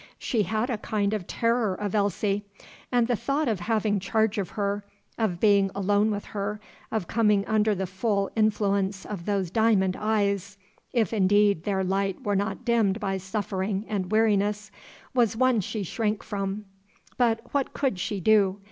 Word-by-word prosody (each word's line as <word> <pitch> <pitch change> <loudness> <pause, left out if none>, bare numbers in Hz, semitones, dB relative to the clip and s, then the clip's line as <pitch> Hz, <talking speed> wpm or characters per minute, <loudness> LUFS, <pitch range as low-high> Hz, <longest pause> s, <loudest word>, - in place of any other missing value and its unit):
She 230 - 0
had 220 +6 -1
a 225 - -2
kind 205 -2 -1
of 205 -5 -3
terror 230 -4 +1
of 205 0 -4
Elsie; 205 0 0 0.5
and 245 -2 +3
the 245 - +2
thought 280 +6 -1
of 220 -5 0
having 215 +1 0
charge 220 +2 +1
of 195 - -2
her, 200 0 -1 0.4
of 195 -6 0
being 200 -2 +4
alone 205 +2 +2
with 205 -1 -3
her, 210 +1 -4 0.3
of 220 -5 -1
coming 210 -3 +2
under 215 -1 +2
the 190 0 -2
full 195 +1 -1
influence 200 -3 +1
of 195 -5 -6
those 195 -4 0
diamond 210 -4 +3
eyes, 200 -2 0 0.3
if, 230 -6 +1
indeed, 205 -3 +3
their 195 -2 0
light 195 +1 -1
were 205 -3 0
not 205 +5 -2
dimmed 225 -4 +2
by 195 -3 -1
suffering 195 0 -2
and 195 -3 -3
weariness, 210 -1 +2 0.4
was 235 -3 +2
one 255 -3 +3
she 205 +3 -4
shrank 210 +3 -2
from. 200 0 -4 0.5
But 230 -2 +3
what 280 -2 -1
could 260 -10 0
she 200 +2 -2
do? 200 0 +3
205 Hz, 165 wpm, -26 LUFS, 195-220 Hz, 0.5 s, being